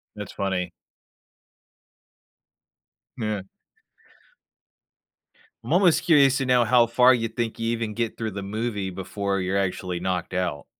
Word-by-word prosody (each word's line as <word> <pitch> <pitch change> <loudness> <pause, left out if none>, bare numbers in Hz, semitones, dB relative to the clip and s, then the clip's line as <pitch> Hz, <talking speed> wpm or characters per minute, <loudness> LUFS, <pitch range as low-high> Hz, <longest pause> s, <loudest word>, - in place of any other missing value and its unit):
That's - - -7
funny. 90 -3 -2 2.5
Yeah. 105 -4 -2 2.2
I'm - - -2
almost 180 -3 +4
curious 140 -6 +5
to 135 - -1
know 125 -1 +4
how 120 0 +4
far 125 +2 +5
you 115 -1 0
think 115 0 -4
you 115 0 -1
even 115 -2 -3
get 115 -1 -3
through 110 -2 -3
the 100 0 -6
movie 105 -1 -3
before 100 +1 -3
you're 95 +2 -1
actually 90 -2 -2
knocked 95 0 -3
out. 90 -6 -2
110 Hz, 130 wpm, -24 LUFS, 95-120 Hz, 2.5 s, curious